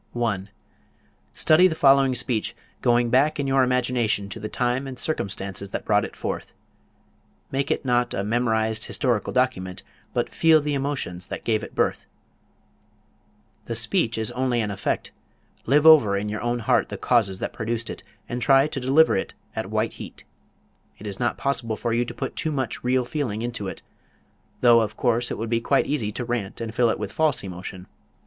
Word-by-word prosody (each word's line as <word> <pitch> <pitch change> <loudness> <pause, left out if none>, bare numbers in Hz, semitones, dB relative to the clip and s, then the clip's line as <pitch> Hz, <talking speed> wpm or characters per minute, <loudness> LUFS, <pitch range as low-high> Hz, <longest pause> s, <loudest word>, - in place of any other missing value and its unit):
1. 105 -5 -2 0.8
Study 165 +4 +5
the 165 - -2
following 135 -3 +4
speech, 120 -3 -1 0.3
going 120 -1 +2
back 145 +4 +3
in 140 - 0
your 135 0 +3
imagination 125 -5 +1
to 110 - -7
the 105 0 -5
time 125 +3 -1
and 130 -1 -7
circumstances 100 -9 -3
that - - -5
brought - - +3
it - - -7
forth. - - -5 1.0
Make 140 +1 -1
it - - -1
not 125 -1 +1
a 95 - -1
memorized 110 0 0
historical 120 -7 0
document, 95 -8 -1 0.3
but - - -2
feel 160 -1 +5
the 150 0 -2
emotions 135 -11 -3
that - - -6
gave 110 -2 0
it - - -9
birth. - - 0 1.6
The 115 - -4
speech 115 - +2
is 110 -1 -1
only 125 -1 0
an 105 -2 -2
effect; 100 0 -2 0.6
live 145 +4 +4
over 140 -11 +7
in 105 +1 -3
your 105 0 -4
own 120 +1 0
heart 110 - +2
the - - -5
causes 110 -6 +2
that - - -4
produced 115 0 -3
it - - -5 0.3
and 120 +1 -4
try 135 +3 +5
to 150 -2 -4
deliver 135 +5 +4
it 95 - -3 0.2
at - - -3
white - - -1
heat. - - -10 0.7
It 105 - -12
is 100 -2 -4
not 120 -1 0
possible 125 -5 -1
for 115 +2 -2
you 120 +1 +1
to - - -7
put 135 - -4
too 160 - -2
much 135 -5 -3
real 125 0 +1
feeling 120 -6 -3
into 120 -4 -3
it, - - -7 0.8
though 120 -2 +6
of 105 -1 -3
course 120 -1 +1
it - - -4
would 115 - -3
be 115 0 +1
quite 135 +4 +2
easy 115 -8 -1
to 120 - -4
rant 115 -5 -3
and 115 -1 -5
fill 120 0 +3
it - - 0
with - - -5
false 155 -7 +1
emotion. 90 0 -7
120 Hz, 190 wpm, -24 LUFS, 110-135 Hz, 1.6 s, over